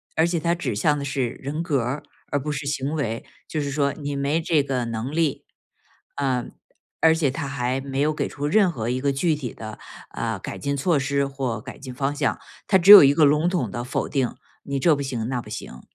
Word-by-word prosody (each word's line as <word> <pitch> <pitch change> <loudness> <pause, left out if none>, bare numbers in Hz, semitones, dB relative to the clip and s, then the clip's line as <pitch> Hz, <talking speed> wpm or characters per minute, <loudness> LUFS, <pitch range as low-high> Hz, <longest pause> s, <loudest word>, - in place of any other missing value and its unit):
而 160 - +4
且 170 -1 0
他 170 +2 +1
指 140 -10 -3
向 145 +8 +2
的 140 - -4
是 140 -3 -1
人 140 +5 -5
格 145 -7 +1
儿 125 +5 -3 0.3
而 145 - +1
不 150 +2 -3
是 140 0 -4
行 140 0 -2
为， 115 -7 -2 0.2
就 155 - -3
是 140 -1 -2
说 140 0 +1
你 145 -2 -5
没 140 +4 0
这 155 -2 +2
个 130 -3 -2
能 115 +3 -4
力。 160 -3 0 0.7
呃， 130 -3 0 0.6
而 160 0 +6
且 145 -5 +1
他 145 0 -4
还 130 -1 -2
没 135 0 -4
有 150 +2 +2
给 - - -2
出 145 0 -5
任 195 +3 +4
何 115 -7 -4
一 130 +1 -1
个 140 - +2
具 155 +4 +1
体 130 -6 -5
的， 110 -1 -9 0.3
呃， - - -3
改 - - -6
进 140 0 -2
措 155 +2 +2
施 140 +1 0
或 135 -5 -3
改 - - -10
进 130 -2 -8
方 135 +3 -1
向， 145 -2 0 0.3
他 190 - +5
只 190 +2 +7
有 205 -5 +13
一 140 0 +6
个 155 - +5
笼 150 +4 +3
统 140 - -1
的 120 +4 -4
否 125 - -2
定， 130 -4 -1 0.3
你 140 -1 -3
这 155 +2 +4
不 140 - -4
行 120 -5 -3
那 125 -1 -2
不 105 - -13
行。 100 -11 -8
140 Hz, 250 characters per minute, -24 LUFS, 130-150 Hz, 0.7 s, 有